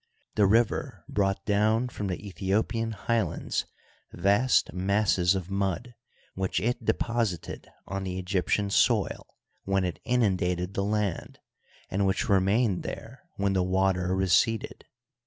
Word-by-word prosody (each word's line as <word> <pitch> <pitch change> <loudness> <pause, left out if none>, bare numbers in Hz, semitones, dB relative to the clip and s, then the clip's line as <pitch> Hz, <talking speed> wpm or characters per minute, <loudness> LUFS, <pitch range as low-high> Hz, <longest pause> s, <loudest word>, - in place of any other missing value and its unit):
The 105 -2 +4
river 115 +3 +1
brought 95 -1 0
down 110 +4 +2
from 105 -4 -4
the 90 - -2
Ethio 100 +1 -1
pian 115 0 -3
highlands 110 -4 -1 0.4
vast 100 +8 +2
masses 95 -1 +2
of 95 0 -4
mud, 100 +5 -2 0.4
which 95 -1 -1
it 120 +5 -1
deposited 115 -8 -2 0.2
on 95 0 -4
the 90 -1 -3
Egyptian 95 +2 0
soil - - +2 0.4
when 95 -1 +1
it 85 -5 -3
inundated 95 -6 0
the 100 - -1
land, 105 -3 -2 0.5
and 100 +1 +1
which 95 - 0
remained 100 +1 +2
there - - -7
when 100 0 0
the 95 - +2
water 95 0 +1
receded. 95 +4 +1
100 Hz, 130 wpm, -27 LUFS, 95-110 Hz, 0.5 s, The